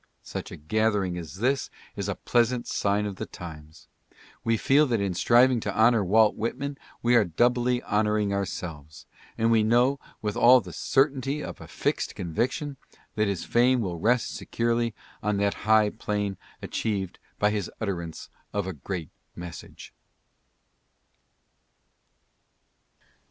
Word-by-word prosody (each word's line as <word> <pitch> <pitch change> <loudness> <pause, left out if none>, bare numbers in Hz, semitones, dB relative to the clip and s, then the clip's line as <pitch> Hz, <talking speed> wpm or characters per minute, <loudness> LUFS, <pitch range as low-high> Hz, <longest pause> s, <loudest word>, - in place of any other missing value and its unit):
Such - - -6
a - - -9
gathering 100 +2 0
as 80 -1 -8
this 130 +7 0 0.3
is - - -3
a - - -1
pleasant 120 0 +1
sign 100 +1 0
of 100 -2 -5
the - - -5
times. 80 -3 -11 0.6
We 115 0 +2
feel 145 +6 +4
that 115 -3 +1
in 100 -2 -1
striving 120 +6 +4
to - - -4
honor 110 -1 +5
Walt 105 +3 +4
Whitman 140 +6 -3 0.2
we 120 +1 +3
are 115 - +6
doubly 120 +7 +1
honoring 105 -1 +1
ourselves, 80 -6 -5 0.3
and 115 +1 +2
we 115 -1 +5
know 120 +5 +3 0.2
with 105 -1 -3
all 125 +2 +7
the 90 -7 -9
certainty 135 +1 +1
of - - -7
a - - -9
fixed - - -2
conviction 125 - -2 0.4
that 105 -1 +1
his 100 -4 -2
fame 125 +2 +3
will 90 -5 -3
rest 120 +6 +1
securely 115 -1 -1 0.3
on 105 0 0
that 100 0 +1 0.2
high 110 -1 +5
plane 105 -2 -2 0.3
achieved 100 -5 -2 0.2
by 105 0 +2
his 105 -4 -2
utterance 85 -7 -4 0.2
of 100 -2 -1
a 95 - -4
great 80 +1 -6 0.2
message. 85 -2 -9
110 Hz, 140 wpm, -26 LUFS, 95-120 Hz, 0.6 s, all